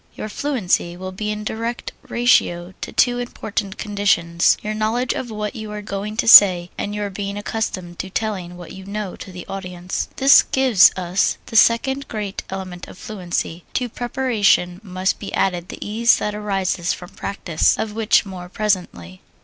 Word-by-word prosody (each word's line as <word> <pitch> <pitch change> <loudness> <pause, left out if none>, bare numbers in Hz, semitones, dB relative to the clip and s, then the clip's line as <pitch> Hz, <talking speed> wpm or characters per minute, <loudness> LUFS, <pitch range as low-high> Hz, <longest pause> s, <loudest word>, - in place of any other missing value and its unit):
Your 215 - -6
fluency 205 -9 -1
will 185 +1 -6
be 210 +3 -4
in 210 0 -3
direct 230 +2 -4 0.2
ratio 185 -7 +2
to - - -5
two 245 -1 +2
important 215 -4 -4
conditions: 200 -5 +2
your 215 0 -2
knowledge 220 +4 0
of 250 - -5
what 210 +2 -4
you 220 -2 -6
are 210 0 -6
going 205 +1 -5
to 235 -1 0
say, 180 -5 +9
and 205 0 -4
your 205 -1 -3
being 200 +1 -4
accustomed 190 -5 -4
to 190 - -4
telling 190 -4 -3
what 175 -2 -10
you 190 0 -10
know 200 -1 -5
to - - -9
an 180 -1 -8
audience. 180 -2 -4
This 275 +1 +7
gives 255 -8 +5
us 185 +1 0
the - - -10
second 265 +5 +3
great 210 -3 -4
element 185 -2 -6
of - - -12
fluency 180 -4 -4
to 250 -2 0
preparation 220 -7 +1
must 185 -1 -1
be 200 - -7
added 180 -2 0
the - - -7
ease 230 +3 +4
that 210 - -2
arises 195 -4 -1
from 180 -1 -9
practise; 175 -5 0
of 215 -1 -3
which 220 -1 +3
more 180 -2 -8
presently. 180 - -2
200 Hz, 175 wpm, -21 LUFS, 180-220 Hz, 0.2 s, say